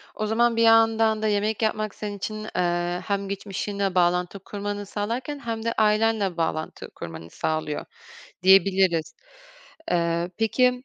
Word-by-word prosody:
O 215 - -2
zaman 230 +2 +2
bir 230 - +1
yandan 225 -1 +4
da 220 - +1
yemek 210 +1 0
yapmak 215 -1 -1
senin 205 -1 -5
için, 215 +2 -5
eee, 175 0 0
hem 200 -1 -1
geçmişinle 200 -1 -3
bağlantı 180 +2 +1
kurmanı 205 +1 -5
sağlarken 235 +8 -4
hem 230 -3 -4
de 230 - 0
ailenle 215 -3 +2
bağlantı 160 -1 -3
kurmanı 80 0 -8
sağlıyor 155 - -2 0.6
diyebiliriz. 190 -3 +4 0.8
Eee, 170 0 0
peki, 250 +3 +2
205 Hz, 135 wpm, -25 LUFS, 180-220 Hz, 0.8 s, yandan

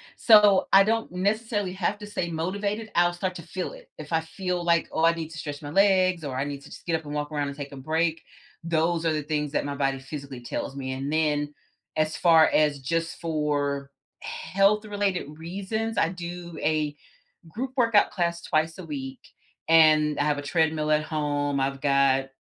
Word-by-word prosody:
So, 210 -4 +6
I 195 0 +8
don't 225 -1 0
necessarily 205 +1 -1
have 190 +2 -1
to 210 - -8
stay 175 -4 -3
motivated, 200 +6 -3
I'll 175 0 +4
start 185 +1 -3
to 170 - -7
feel 180 +2 -5
it. - - -14
If 155 +1 -8
I 160 - +4
feel 180 +2 -3
like, 170 -1 +2
"Oh, 160 - -1
I 165 - +5
need 165 -1 -5
to 165 - -9
stretch 145 -2 -6
my 145 - -6
legs 185 -2 +3
or 130 -3 -4
I 135 - 0
need 140 -1 -5
to 140 - -14
just - - -12
get 165 -2 0
up 160 - -12
and 145 - -6
walk 145 +1 -3
around 145 -1 -1
and 140 +1 -7
take 140 -1 -6
a 140 - -9
break," 160 +4 0 0.4
those 165 0 0
are 160 - +2
the 150 -1 -2
things 150 -1 -2
that - - 0
my 145 - -3
body 135 -1 0
physically 135 -2 -8
tells 135 +3 -5
me 130 -1 -4
and 135 +2 -4
then, 150 -2 0 0.4
as 155 0 +1
far 165 -1 +6
as 150 -2 +3
just 165 +5 -2
for 145 -3 -1 0.3
health-related 200 -2 0
reasons, 200 +6 -3
I 165 - +3
do 175 -2 -7
a 150 -1 0 0.5
group 250 +10 -5
workout 230 -5 +4
class 170 -2 -1
twice 155 +1 0
a 185 - -7
week, 135 -4 -6 0.5
and 155 -2 +5
I - - +3
have 150 -1 +1
a - - -4
treadmill 155 0 0
at 150 0 +3
home, 145 -2 -1
I've 135 0 -1
got 140 -1 +3
160 Hz, 200 wpm, -26 LUFS, 145-180 Hz, 0.5 s, I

